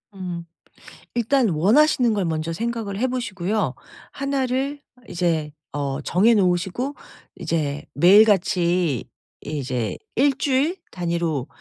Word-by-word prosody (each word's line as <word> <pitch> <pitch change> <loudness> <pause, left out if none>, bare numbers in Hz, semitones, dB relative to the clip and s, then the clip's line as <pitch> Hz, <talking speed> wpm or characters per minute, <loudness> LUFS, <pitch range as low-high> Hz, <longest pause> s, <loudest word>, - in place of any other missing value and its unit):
음. 180 -3 -5 0.7
일단 240 0 +2
원하시는 230 - +4
걸 200 -3 0
먼저 160 0 -2
생각을 225 0 -3
해 255 - +2
보시고요. 205 - -2 0.4
하나를 275 0 -1 0.3
이제 165 -4 -1 0.2
어 140 -1 -3
정해놓으시고 190 - +2 0.4
이제 145 -3 -2
매일같이 180 - +4 0.4
이제 125 -8 -3 0.2
1 275 +2 +3
주일 285 +6 +1
단위로 170 -6 -2
185 Hz, 220 characters per minute, -23 LUFS, 165-240 Hz, 0.7 s, 원하시는